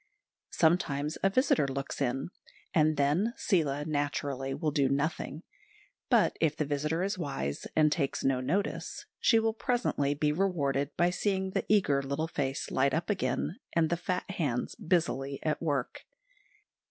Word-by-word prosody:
Sometimes 155 -3 +1
a 195 - +4
visitor 195 - +3
looks 135 +1 -4
in, 135 +5 -1 0.4
and 155 -3 +3
then 155 +11 +2
Seela, 150 -7 +1
naturally, 145 -3 -2
will 155 +2 -1
do 140 -3 +2
nothing; 150 +2 -2 0.7
but - - +4
if 155 -2 +2
the 150 - 0
visitor 150 +4 -1
is 195 -1 -2
wise 70 - -3
and 155 -1 +4
takes 140 -4 -1
no 135 -1 +2
notice, 190 - -2
she 230 - +4
will 225 0 +2
presently 220 - 0
be 150 0 +1
rewarded 145 -6 0
by 175 +1 +3
seeing 190 0 -1
the - - -2
eager 185 -10 +3
little 140 +4 -2
face 135 -4 -3
light 140 +2 +2
up 170 +4 -1
again, 175 - -1
and 165 -1 +2
the - - +3
fat 180 +1 -3
hands 145 -10 -1
busily 140 -6 0
at 155 -1 -1
work. 145 -6 -2
150 Hz, 155 wpm, -30 LUFS, 140-175 Hz, 0.7 s, a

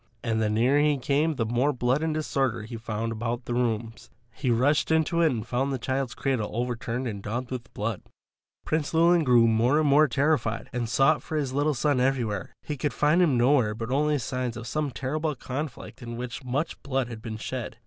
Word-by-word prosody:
And 110 -1 0
the 110 - +1
nearer 120 +7 +3
he 150 -1 +3
came 145 +5 +1
the 115 - -1
more 120 +6 +1
blood 125 +2 0
and 160 0 0
disorder 135 -7 -1
he 115 +2 -7
found 115 0 -3
about 120 +2 -3
the 120 - -3
rooms. 115 -2 -2 0.2
He 125 +5 -3
rushed 130 +6 +2
into 160 +1 +2
it 165 - +5
and 115 -5 -3
found 130 +3 -1
the 135 - -1
child's 130 +1 -2
cradle 130 -6 -1
overturned 120 +1 -2
and 100 -4 -5
daubed 120 +5 -4
with 130 -1 -6
blood. 105 -1 -2 0.6
Prince 155 0 -1
Llewelyn 170 +1 +5
grew 120 -4 +5
more 115 +6 +3
and 155 - +2
more 150 +2 +5
terrified, 130 -4 0
and 120 -2 -2
sought 135 +6 +3
for 155 - -4
his 135 -4 -2
little 145 +1 +1
son 145 +1 +1
everywhere. 120 -7 0
He 150 - -4
could 140 0 -1
find 150 +7 +3
him 150 -8 +3
nowhere 120 -3 +3
but 115 +2 -5
only 150 +2 +2
signs 125 -2 -3
of 115 - -7
some 150 +4 -1
terrible 145 +4 -2
conflict 135 +1 -6
in 120 -1 -6
which 125 +2 -6
much 135 +6 -2
blood 135 -2 -1
had 115 -2 -8
been 110 -1 -5
shed. 115 0 -5
125 Hz, 210 wpm, -26 LUFS, 115-145 Hz, 0.6 s, it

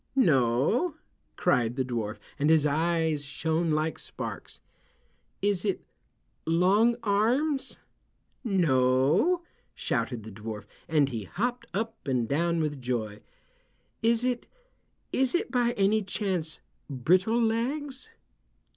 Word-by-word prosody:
"No," 155 - +3 0.4
cried 120 -1 +2
the 130 -1 0
dwarf 115 -4 -3 0.2
and 145 +2 +2
his 160 -2 +5
eyes 160 0 +1
shone 160 +4 -1
like 155 0 0
sparks. - - -7 0.8
"Is 200 -3 +1
it 200 -3 -1 0.6
Long 195 +8 +4
Arms?" 245 +8 +1 0.7
"No," 155 - +3 0.3
shouted 120 -4 -2
the 110 - -9
dwarf, 105 0 -7 0.2
and 150 -3 +3
he 115 -5 -4
hopped 245 - -2
up 220 0 -4
and 125 -4 +1
down 170 +4 +1
with 145 -3 -2
joy. 110 -4 -2 0.8
"Is 230 +1 +3
it—is 265 - -3
it 405 +6 0
by 240 -2 +2
any 205 +1 +2
chance 185 -6 -2 0.3
Brittle 180 - +2
Legs?" 260 - -1
170 Hz, 110 wpm, -28 LUFS, -, 0.8 s, his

